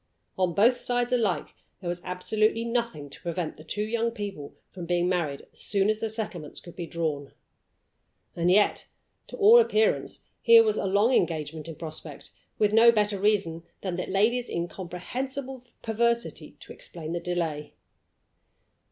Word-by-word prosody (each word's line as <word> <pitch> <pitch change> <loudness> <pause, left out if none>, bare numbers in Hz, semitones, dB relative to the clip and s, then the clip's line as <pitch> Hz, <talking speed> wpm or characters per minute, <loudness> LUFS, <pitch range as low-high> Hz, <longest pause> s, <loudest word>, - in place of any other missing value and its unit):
On 185 -2 0
both 235 +5 +5
sides 245 -1 -1
alike 220 -7 0 0.3
there 180 - -7
was 175 0 -2
absolutely 215 +5 0
nothing 230 -11 -2
to - - -8
prevent 170 -1 -3
the 155 - -12
two 205 +6 -1
young 230 +2 0
people 200 -10 -7 0.2
from 175 -2 -8
being 175 0 +1
married 165 -6 -1
as - - -12
soon 200 +1 +1
as 215 - -2
the 225 - -2
settlements 210 -9 -5
could 175 - -13
be 170 -2 -5
drawn. 155 -5 -3 1.0
And 170 +1 +1
yet, 205 +3 +3 0.4
to - - -9
all 445 +2 +8
appearance, 455 +1 +1 0.2
here 460 0 +8
was 430 -1 +1
a - - -1
long 205 +6 +3
engagement 155 -5 -1
in 165 - -7
prospect, 155 -1 -8 0.3
with 210 -1 +2
no 230 +1 +8
better 210 -3 0
reason 195 -5 +1 0.2
than 185 -3 -3
the 180 - -3
lady's 230 +6 +1
incomprehensible 245 +10 -5 0.2
perversity 235 +1 -1
to - - -10
explain 160 -2 -9
the 175 - -1
delay. 170 -4 -3
195 Hz, 160 wpm, -27 LUFS, 170-235 Hz, 1.0 s, all